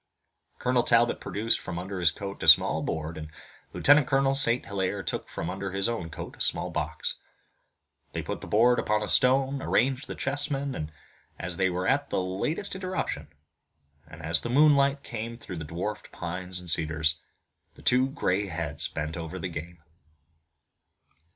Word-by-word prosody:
Colonel 125 0 +2
Talbot 120 0 +3
produced 110 +3 0
from 85 - -6
under 95 +2 -5
his 85 -2 +5
coat 100 +4 -7
a - - -2
small - - +7
board, 80 0 -4
and 75 0 -7 0.4
Lieutenant 145 -2 +5
Colonel 135 0 +2
St. 125 -3 +4
Hilaire 100 0 -2
took - - -4
from 80 - -5
under 95 +2 -4
his 95 +1 0
own 115 -8 -3
coat 80 - -8
a - - -11
small - - +2
box. - - -2 0.9
They - - -4
put - - -5
the - - -8
board 120 +3 +4
upon 105 - +1
a - - +2
broad 105 - -2
stone, 135 +1 +3
arranged 130 +3 +1
the - - -6
chessmen, 140 - -2 0.5
as 85 0 -3
they 95 -1 +2
were 90 +1 -2
at 145 +1 +1
the - - 0
latest 95 - -2
interruption, 185 - -3 0.8
and, 80 +1 -12
as 80 +1 0
the 120 - -4
moonlight 140 0 +4
came 115 0 -6
through 95 -6 -8
the 80 - -5
dwarfed 90 +7 -5
pines 90 +1 -4
and 90 - -10
cedars, 80 0 +1 0.6
the - - -16
two 130 +2 +3
gray 100 -6 0
heads 80 -4 -3
bent 75 +2 -4
over 80 -2 -6
the - - -4
game. 85 +1 -8
100 Hz, 170 wpm, -27 LUFS, 85-130 Hz, 0.9 s, small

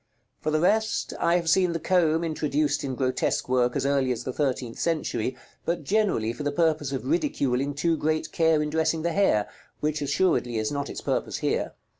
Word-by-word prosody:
For 155 - -2
the 155 0 +2
rest, 220 +5 +1
I 170 +1 +3
have 170 -2 0
seen 180 +1 +3
the 165 - -2
comb 165 -1 +2
introduced 150 -2 0
in 135 -2 -3
grotesque 130 -1 0
work 125 -1 +2
as - - 0
early 140 -2 +2
as 120 - -3
the 130 - -4
thirteenth 130 -5 -2
century, 140 -7 -1 0.3
but 170 -1 -2
generally 165 - +1
for 150 - -8
the 145 0 -1
purpose 155 -2 +1
of 135 - -3
ridiculing 140 - 0
too 165 +3 +1
great 155 +1 -1
care 160 -2 +3
in 150 - -3
dressing 160 0 0
the 170 0 0
hair, 135 - +2 0.3
which 150 0 -1
assuredly 145 -5 +1
is 110 +3 -1
not 140 -1 -3
its - - -6
purpose - - -1
here. - - -1
150 Hz, 195 wpm, -26 LUFS, 135-165 Hz, 0.3 s, I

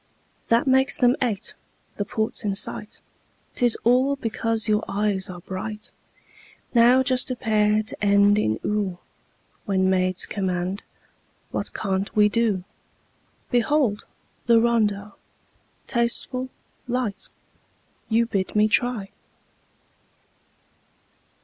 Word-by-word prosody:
That 230 +1 +3
makes 265 +1 +3
them 245 0 +4
eight. 225 -6 -1 0.4
The 205 - -2
port's 220 +2 -1
in 200 -2 -1
sight - - -3 0.5
'Tis 240 -2 +3
all 255 +4 +3
because 225 -3 -2
your 210 -1 +2
eyes 200 -2 -1
are 180 -1 -8
bright! 210 +4 -7 0.8
Now 245 +2 +5
just 255 0 +2
a 255 - -2
pair 215 -2 +2
to 215 - -5
end 200 0 +4
in 110 - 0
"oo" 205 -4 -1 0.7
When 190 -1 +1
maids 185 -1 +1
command, 185 0 -2 0.7
what - - -4
can't 195 -1 -2
we 210 -1 +5
do? 215 -4 0 0.9
Behold! 245 -3 +1 0.4
the 230 -1 +6
rondeau, 210 -3 +1 0.7
tasteful, 255 +2 -1 0.4
light, 240 -5 -3 0.8
You 230 +1 +3
bid 195 -4 -3
me 210 0 +4
try! 215 -3 0
215 Hz, 110 wpm, -24 LUFS, 200-235 Hz, 0.9 s, the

